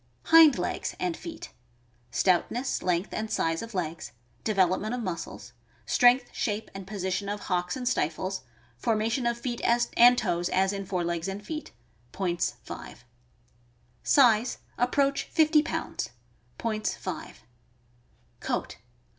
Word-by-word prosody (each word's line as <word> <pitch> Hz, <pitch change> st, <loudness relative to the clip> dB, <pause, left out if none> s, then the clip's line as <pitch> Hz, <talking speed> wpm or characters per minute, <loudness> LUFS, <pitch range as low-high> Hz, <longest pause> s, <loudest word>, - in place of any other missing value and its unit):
Hind 325 Hz, -3 st, +7 dB
legs -, -, -2 dB
and 360 Hz, -2 st, -1 dB
feet. 330 Hz, -1 st, -8 dB, 0.3 s
— 120 Hz, 0 st, -37 dB
Stoutness, 215 Hz, +8 st, +1 dB
length, 180 Hz, +2 st, 0 dB
and 220 Hz, 0 st, -3 dB
size 165 Hz, -6 st, 0 dB
of 230 Hz, -2 st, -8 dB
legs; 165 Hz, -2 st, -4 dB, 0.3 s
development 200 Hz, +2 st, +1 dB
of 245 Hz, -, -4 dB
muscles; 180 Hz, -4 st, -6 dB, 0.3 s
strength, 245 Hz, 0 st, +4 dB
shape, 210 Hz, 0 st, -2 dB
and 195 Hz, -1 st, -8 dB
position 190 Hz, 0 st, -2 dB
of 205 Hz, 0 st, -3 dB
hocks 180 Hz, +3 st, -1 dB
and 250 Hz, -1 st, -4 dB
stifles; 185 Hz, +2 st, -1 dB, 0.4 s
formation 230 Hz, -, 0 dB
of 235 Hz, 0 st, 0 dB
feet 235 Hz, 0 st, -4 dB, 0.3 s
and 245 Hz, +1 st, +7 dB
toes, 175 Hz, -5 st, 0 dB
as 190 Hz, +1 st, +2 dB
in 195 Hz, -1 st, -5 dB
fore 180 Hz, -2 st, -1 dB
legs 170 Hz, 0 st, -2 dB
and 200 Hz, +2 st, -5 dB
feet. 310 Hz, -1 st, -5 dB, 0.4 s
Points, 175 Hz, -3 st, -1 dB
5. 120 Hz, -, -9 dB, 1.0 s
Size. 240 Hz, -4 st, +4 dB
— -, -, -34 dB
Approach 280 Hz, +2 st, +1 dB
fifty 310 Hz, -1 st, +4 dB
pounds. 325 Hz, +1 st, -3 dB, 0.5 s
Points, 215 Hz, -2 st, -2 dB
5. -, -, -7 dB, 1.0 s
Coat. -, -, -3 dB
210 Hz, 135 wpm, -28 LUFS, 180-245 Hz, 1.0 s, Hind